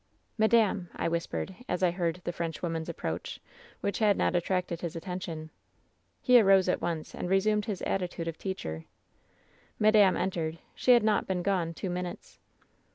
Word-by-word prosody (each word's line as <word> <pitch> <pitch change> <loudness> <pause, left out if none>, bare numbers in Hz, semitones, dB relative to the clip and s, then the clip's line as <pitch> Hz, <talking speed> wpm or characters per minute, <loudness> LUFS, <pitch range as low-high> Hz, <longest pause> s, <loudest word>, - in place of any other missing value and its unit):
" - - -38
^Madame 220 -4 +3
!' - - -19
I - - -1
whispered, 170 +3 -3
as 180 +1 -1
I 180 - +4
heard 175 0 -2
the - - -2
French 170 0 -4
woman's 165 -1 -2
approach, 85 - -4 0.4
which 200 - -1
had 210 -3 +4
not - - +1
attracted 175 -1 -1
his 170 -2 -4
atten 180 +2 -4
tion. 160 -4 -6 0.7
"He 250 -1 +7
arose 195 -2 +5
at 180 - +1
once, 165 -2 -3
and 175 - -4
resumed 210 +2 +2
his 205 -5 -4
attitude 180 -3 -2
of 165 -1 -5
teacher. 80 - -5 0.9
"Madame 210 -3 +5
entered. 165 -4 -2 0.2
She 250 - +4
had 240 - +5
not 215 -1 +2
been 180 -2 -1
gone 175 -4 0
two 190 +1 -4
min 180 0 -2
utes. - - -11
180 Hz, 180 wpm, -29 LUFS, 170-200 Hz, 0.9 s, He